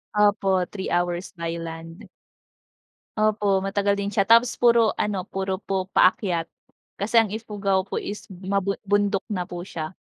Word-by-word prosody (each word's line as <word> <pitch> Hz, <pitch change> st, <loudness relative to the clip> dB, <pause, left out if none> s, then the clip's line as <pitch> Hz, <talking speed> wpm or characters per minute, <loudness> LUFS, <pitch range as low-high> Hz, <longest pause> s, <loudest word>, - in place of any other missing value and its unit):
Opo, 195 Hz, -3 st, +3 dB
3 190 Hz, -2 st, -5 dB
hours 175 Hz, +1 st, -1 dB
by 165 Hz, 0 st, -3 dB
land. 165 Hz, +4 st, -8 dB, 1.1 s
Opo, 210 Hz, -2 st, +2 dB
matagal 200 Hz, +1 st, 0 dB
din 200 Hz, -, -2 dB
siya 200 Hz, -1 st, +1 dB
tapos 230 Hz, +3 st, +5 dB
puro 235 Hz, -2 st, +4 dB
ano, 200 Hz, -3 st, -2 dB
puro 190 Hz, 0 st, -3 dB
po 190 Hz, -2 st, -2 dB
paakyat, 180 Hz, -4 st, +2 dB, 0.5 s
kasi 225 Hz, +3 st, +3 dB
ang 225 Hz, -, +3 dB
Ifugao 200 Hz, -3 st, -1 dB
po 195 Hz, -, -4 dB
is 210 Hz, -, -6 dB
mabun 195 Hz, +1 st, -2 dB
bundok 205 Hz, -1 st, +1 dB
na 185 Hz, -4 st, -2 dB
po 175 Hz, +1 st, -8 dB
siya. 155 Hz, +1 st, -5 dB
195 Hz, 150 wpm, -24 LUFS, 185-210 Hz, 1.1 s, tapos